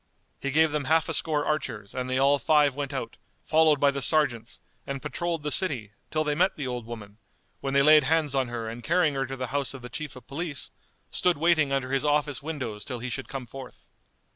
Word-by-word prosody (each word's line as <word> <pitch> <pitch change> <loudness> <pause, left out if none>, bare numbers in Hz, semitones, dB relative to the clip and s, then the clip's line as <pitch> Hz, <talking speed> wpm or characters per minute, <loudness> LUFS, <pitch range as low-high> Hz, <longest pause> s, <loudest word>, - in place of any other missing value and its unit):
He 140 - -2
gave 155 +2 +4
them 150 -2 -1
half 160 +2 +3
a - - -1
score 150 -2 0
archers 120 -10 -2
and 130 0 -3
they 130 - +1
all 140 +2 +4
five 145 +1 +4
went 140 0 -4
out, 130 -4 -5 0.3
followed 155 -2 +4
by 140 0 +4
the 140 0 -4
sergeants, 130 -7 +1 0.3
and 140 0 -3
patrolled 170 +1 -3
the 150 - -2
city, 130 - 0 0.2
till 155 0 0
they 150 -1 0
met 180 +6 +2
the 145 - -4
old 125 -3 -4
woman, 105 -3 -9 0.4
when 135 0 -3
they 140 - +6
laid 150 -1 +7
hands 155 -1 +2
on 135 -2 +1
her 120 -2 -4
and 115 +2 -7
carrying 170 -1 +3
her 135 -1 -1
to 135 +1 -5
the 130 -2 -4
house 140 -1 -1
of 130 - -10
the 125 - -7
Chief 155 -1 -6
of 125 -2 -12
Police, 150 +1 -5 0.4
stood 180 -3 +2
waiting 155 -2 +3
under 135 -1 -1
his 135 +1 +1
office 145 -2 +1
windows 130 -9 -5
till 125 +1 -5
he 125 +2 -5
should 135 +2 -5
come 135 -2 -5
forth. 130 +1 -11
140 Hz, 230 wpm, -27 LUFS, 130-155 Hz, 0.4 s, laid